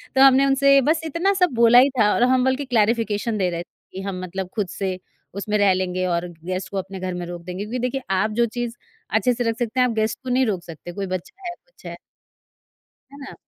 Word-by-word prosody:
तो 265 - +4
हमने 270 0 +7
उनसे 275 0 +5
बस 315 +4 +1
इतना 335 +6 +1
सब 360 -2 +4
बोला 235 +1 +7
ही 270 +2 +5
था 210 -1 +4
और 240 - +2
हम 255 -1 +3
बल्कि 265 +2 0
क्लैरिफिकेशन 225 -2 +1
दे 185 -2 +1
रहे 170 0 -4
थे - - -39 0.3
कि 190 - -5
हम 190 -2 -4
मतलब 185 +1 -5
खुद 205 -4 -1
से 185 -2 -3 0.4
उसमें 210 +1 -1
रह 200 -2 +4
लेंगे 185 0 -1
और 175 0 -1 0.2
गेस्ट 185 +1 -3
को 195 - -3
अपने 190 0 -5
घर 185 -1 -3
में 180 0 -4
रोक 175 0 -7
देंगे, 180 +3 -5
क्योंकि 245 +4 -4
देखिए 250 +2 -2 0.2
आप 215 0 0
जो - - +5
चीज़ 240 -1 -3 0.3
अच्छे 220 +3 +2
से 240 0 -2
रख 225 - -3
सकते 240 +2 -2
हैं 250 - +5
आप 230 - -2
गेस्ट 220 0 -1
को 255 - -5
नहीं 255 +1 +3
रोक 190 -6 -2
सकते, 170 +1 -9
कोई 195 +1 -4
बच्चा 360 - -9
है, - - -5
कुछ - - -24
है। - - -6 1.2
है 280 - -12
ना? 275 - -9
220 Hz, 245 wpm, -22 LUFS, 185-255 Hz, 1.2 s, हमने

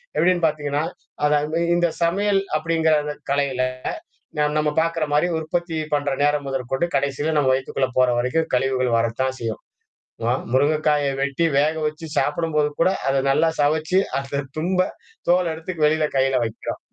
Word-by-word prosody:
எப்படின்னு 180 -1 +2
பார்த்தீங்கன்னா, 145 -1 0 0.4
அத 150 - +3
அந்த 155 +2 -2 0.2
இந்த 175 0 +3 0.2
சமையல் 195 +3 +2 0.2
அப்படிங்கிற 160 0 +2 0.4
கலையில 140 -2 0 0.8
ந 150 - +3
நம்ம 150 0 +2
பார்க்கற 165 -1 -1
மாரி 150 +4 +3
உற்பத்தி 165 +1 -2 0.2
பண்ற 145 0 -1 0.2
நேரம் 145 -1 +1
முதற்கொண்டு 135 +3 -1
கடைசியில 140 +3 -1
நம்ம 145 -3 +3
வயக்குக்குள்ள 130 0 0
போற 130 -1 +5
வரைக்கும் 145 +7 0
கழிவுகள் 130 -2 +1
வரத்தான் 115 +3 -1
செய்யும். 115 -2 -5 0.6
ம 120 - +2 0.2
முருங்கைக்காய 150 +1 +2
வெட்டி 140 +4 0
வேக 150 +3 +3
வச்சு 155 +2 -3
சாப்பிடும்போது 150 -1 +1
கூட 170 - +4 0.2
அத 135 - +2
நல்லா 135 +4 +3
சுவச்சி 155 +4 +1 0.2
அ - - +1 0.4
திரும்ப 180 +4 0 0.5
தோள்ல 175 -1 +3
எடுத்து 160 +3 -6
வெளில 155 +1 +3
கையில 135 0 +2
வைக்கிறோம். 110 -1 -5
150 Hz, 145 wpm, -22 LUFS, 135-165 Hz, 0.8 s, போற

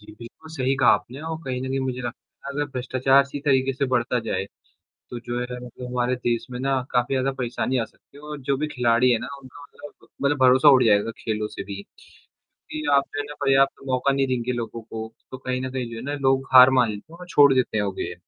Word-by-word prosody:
जी, 105 - -14
बिल्कुल 120 +7 -12
सही 135 -3 0
कहा 130 -2 +3
आपने 130 +4 -6
और 160 0 -4
कहीं 130 -1 -3
न 130 - -4
कहीं 135 +1 -1
मुझे 130 -1 -3
लगता 120 +2 -9
है - - -4
अगर 145 +1 0
भ्रष्टाचार 130 +1 +3
इसी 140 +1 -7
तरीके 135 -2 +2
से 135 +2 -1
बढ़ता 125 -1 0
जाए, 110 -3 -2 0.7
तो 120 - -5
जो 120 +1 -4
है 125 0 -4
मतलब 125 +1 -9
हमारे 125 0 0
देश 120 -2 -2
में 125 - -5
ना 135 0 +1
काफ़ी 125 +2 +1
ज़्यादा 135 +1 0
परेशानी 125 +1 -1
आ 115 - 0
सकती 110 - -22
है। - - -13
और 150 -1 -7
जो 135 +1 0
भी 150 +3 -2
खिलाड़ी 125 -3 +2
है 115 - +2
ना 120 - -6
उनका 135 +2 -14
मतलब 145 +1 -15
मतलब 140 +1 +2
भरोसा 130 +3 +6
उठ 130 -3 +7
जाएगा 105 0 +3
खेलों 110 -1 -2
से - - -7
भी। 100 0 -7 0.7
क्योंकि 155 - -9
आप 140 - +3
जो - - -3
है - - -3
ना 150 - -8
पर्याप्त 135 0 +3
मौका 130 +1 +1
नहीं 135 0 +1
देंगे 125 -1 -1
लोगों 115 -1 -5
को 110 0 -7 0.2
तो 130 - -7
कहीं 130 0 -3
न 130 0 -4
कहीं 125 -3 -4
जो 115 - -7
है 115 - -7
ना 145 - -3
लोग 135 0 +1
हार 130 0 +10
मान 120 -2 +4
लेते 105 +9 -9
हैं 170 - -12
और 180 - -9
छोड़ 145 -5 +6
देते 125 -4 0
हैं 105 - +1
वो 100 - -2
गे 90 - -5
130 Hz, 255 wpm, -24 LUFS, 120-135 Hz, 0.7 s, हार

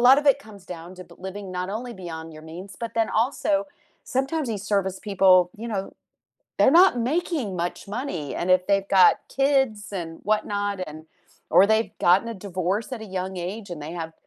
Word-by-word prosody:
lot 255 +3 +8
of 295 - -10
it 260 - -3
comes 200 -3 -13
down 170 +2 -10
to 185 - -9
b - - -18
living 190 +1 -7
not 180 +1 -3
only 245 +1 -6
beyond 165 -4 -8
your 155 - -11
means, 180 +4 -10
but 230 - -4
then 225 -1 +2
also, 275 +5 -2 0.7
sometimes 270 +1 0
these 210 -3 -3
service 190 -1 +1
people, 185 -2 +5
you 230 +2 -6
know 195 -3 -3 0.7
they're 340 - +6
not 315 -10 +4
making 315 - -1
much 175 - -5
money 175 - -4
and 175 - -2
if 185 0 +5
they've 195 -1 +1
got 180 - +8
kids 270 -6 +2 0.2
and 165 -1 -8
whatnot 205 -1 0
and 155 +1 -10 0.5
or 195 - +7
they've 220 +1 +2
gotten 185 +6 +4
a 230 - -4
divorce 190 +6 -2
at 240 - -4
a 205 -3 -10
young 190 +1 -4
age 195 +4 -5
and 170 -4 -6
they 155 +3 -6
have, 165 -2 -5
195 Hz, 200 wpm, -25 LUFS, 180-230 Hz, 0.7 s, lot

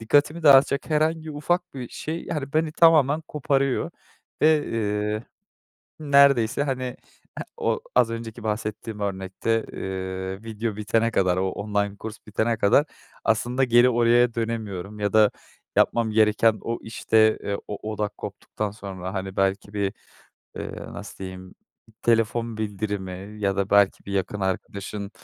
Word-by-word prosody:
dikkatimi 145 +8 +2
dağıtacak 140 +1 +5
herhangi 155 +1 +1
ufak 175 +3 -1
bir 125 -3 -6
şey, 160 +2 -5
yani, 145 -3 -4
beni 155 0 +1
tamamen 155 -3 +5
koparıyor. 140 -3 0 0.5
Ve, 155 -1 +4
eee, 105 0 -1 0.8
neredeyse 140 -4 +4
hani 130 -2 -2 0.6
eee, - - -4
o - - 0
az 120 -2 +4
önceki 115 -1 -6
bahsettiğim 105 0 -4
örnekte, 100 +3 -1
eee, 95 +1 -4
video 110 -1 -3
bitene 115 +2 +1
kadar, 90 -4 +2
o 95 +1 +1
online 100 0 -2
kurs 110 +1 -7
bitene 110 +2 0
kadar, 125 +10 +4 0.4
aslında 120 +4 +2
geri 120 +1 +5
oraya 120 0 +4
dönemiyorum 105 -4 -4
ya 100 -1 0
da 110 -1 +6 0.5
yapmam 115 -2 +3
gereken 110 0 +3
o 115 0 -2
işte, 110 -1 +2
eee, 100 0 -2
o 105 +1 -5
odak 105 -1 -3
koptuktan 105 -1 -5
sonra 95 -2 -7
hani 95 0 -4
belki 95 +1 0
bir, 100 -1 0 0.7
eee, - - -5 0.2
nasıl - - -9
diyeyim, 95 -1 -8 0.5
telefon 115 0 +1
bildirimi 100 -2 -4
ya 100 -1 0
da 100 0 -1
belki 100 -1 +4
bir 100 - -5
yakın 100 +1 -2
arkadaşın, 100 +2 -3
110 Hz, 140 wpm, -25 LUFS, 100-125 Hz, 0.8 s, da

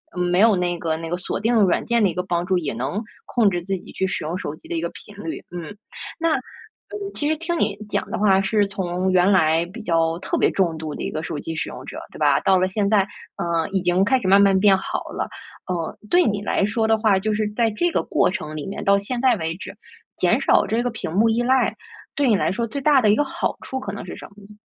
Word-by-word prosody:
嗯， 180 - -2
没 180 +1 +1
有 220 0 +6
那 175 -1 -1
个 160 -1 -1
那 165 0 -6
个 175 - -1
锁 180 - -3
定 230 +3 +1
软 185 -3 +3
件 235 -2 +1
的 195 - +4
一 - - -4
个 180 - -1
帮 175 -1 -1
助， 185 -1 +1
也 150 -7 -3
能 130 - -2 0.2
控 225 -5 +3
制 175 -2 -2
自 195 +1 -2
己 - - -13
去 190 - -1
使 175 -4 -3
用 165 +4 -3
手 150 - -5
机 - - -17
的 - - -3
一 165 - -1
个 170 - -2
频 205 - -12
率， 165 - -5
嗯。 175 +3 -7 0.4
那， 330 -1 +2
嗯， 405 -1 -9
其 295 - 0
实 315 - +2
听 335 +1 -2
你 205 -1 +1
讲 - - -1
的 - - -1
话 195 -2 +4
是 200 +1 +1
从 185 -1 -2
原 185 +2 +4
来 165 -3 +3
比 230 - -7
较 165 -3 +1
特 - - -2
别 - - +3
重 170 -4 0
度 155 -1 -5
的 - - -7
一 - - -2
个 155 +1 -4
手 150 - -4
机 160 - -5
使 155 - -2
用 - - -9
者， - - -7
对 - - -12
吧？ 145 -2 +4
到 190 +1 +4
了 185 - +2
现 200 +1 -1
在， 210 -1 +4 0.4
呃， 170 -1 -1
已 190 - +1
经 180 +2 +2
开 260 +5 +3
始 195 - -3
慢 195 +2 +6
慢 195 -1 +5
变 195 -1 +5
好 190 - -3
了， - - -3 0.4
呃， 175 -3 -3
对 355 0 +6
你 205 -1 -1
来 205 - 0
说 220 +2 +1
的 220 - +4
话， 215 -3 +3
就 215 +3 -1
是 215 0 0
在 230 -1 +2
这 345 +12 0
个 - - 0
过 - - +2
程 155 0 -5
里 150 - -5
面， 195 - -5
到 200 0 +4
现 240 +5 -4
在 255 -2 +4
为 165 -1 -3
止， - - -8 0.4
减 - - +2
少 - - +3
这 225 +2 0
个 245 - 0
屏 220 -8 -5
幕 210 +6 +3
依 225 +2 +1
赖， 260 +2 +2 0.4
对 280 -3 +2
你 215 - +5
来 155 - +1
说 230 +5 -1
最 235 +6 -4
大 285 -1 +5
的 215 - +3
1 210 - +5
个 295 - +3
好 270 - -2
处 265 - -4
可 200 - -5
能 200 - -7
是 - - -7
什 - - -10
么 200 - -23
呢？ 210 - -14
195 Hz, 295 characters per minute, -22 LUFS, 175-220 Hz, 0.4 s, 有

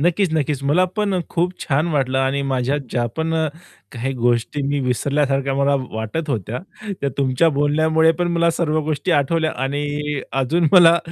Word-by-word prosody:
नक्कीच-क्कीच. 160 -5 +1
मला 150 +7 +3
पण 200 -3 0
खूप 175 +1 0
छान 145 +3 0
वाटलं 135 -2 +1
आणि 135 +1 0
माझ्या 135 0 0
ज्या 120 -1 0
पण 160 0 -1
अ, 160 -1 +1 0.5
काही 130 +1 -3
गोष्टी 120 +3 0
मी 145 0 0
विसरल्यासारख्या 135 +1 0
मला 140 +1 +2 0.2
वाटत 110 +9 -4
होत्या 115 0 -3 0.4
त्या 140 - 0
तुमच्या 135 +4 +2
बोलण्यामुळे 155 +2 +2
पण 175 - +1
मला 170 0 +3
सर्व 155 -2 0
गोष्टी 155 +4 -2
आठवल्या 155 +2 +1
आणि 145 +1 -2
अजून 145 +6 +1
मला 170 -2 +7
145 Hz, 155 wpm, -20 LUFS, 135-160 Hz, 0.5 s, मला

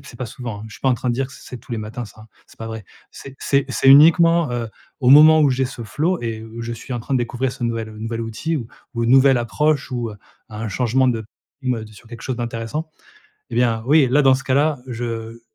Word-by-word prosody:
c'est 120 - -12
pas 125 - -4
souvent. 115 -2 -7
Je - - -13
suis - - -14
pas 135 - +1
en 130 - +3
train 125 +1 -4
de - - 0
dire 135 +1 -1
que 135 - -16
c'est - - -14
c'est 125 - -8
tous 120 - -12
les 115 - -2
matins 110 +3 -6
ça, 110 +1 -14 0.2
c'est - - -21
pas 115 - -6
vrai. 110 -3 -7 0.3
C'est 135 -1 -11
c'est 140 -1 +1
c'est 135 - +1
uniquement, 165 +3 +6
heu, 120 -2 -3 0.3
au 125 -1 +3
moment 155 +2 +8
où 145 - +4
j'ai 130 +1 0
ce 125 -2 -8
flow 155 - -1
et 110 -1 -4 0.2
je 115 0 -4
suis 120 +3 -8
en 120 - -3
train 135 - -7
de - - +3
découvrir 125 +2 -2
ce 120 - -5
nouvel 115 -1 -2
ce 110 - -11
nouvel 115 +1 -4
outil 135 +9 -3
ou 120 -5 -5 0.3
ou 115 -1 -1
une 120 - +1
nouvelle 135 -1 +6
approche 140 +5 0
ou, 120 -3 -3
heu, 105 - -10 0.3
un 110 +1 -5
changement 125 +4 +1
de, 115 -3 -1 0.4
mmh 125 -4 -2
«tu 110 - -14
es - - -16
sur 115 +2 -17
quelque 115 -1 -10
chose 130 -2 -3
d'intéressant!». 120 +6 -4 0.6
Eh 115 - -6
bien, 115 -2 +2
oui, 150 -2 +5
là, 145 +2 +4
dans 135 -1 +5
ce 135 - -6
cas-là, 145 +2 +1
je 115 -1 -5
120 Hz, 265 wpm, -20 LUFS, 115-135 Hz, 0.6 s, moment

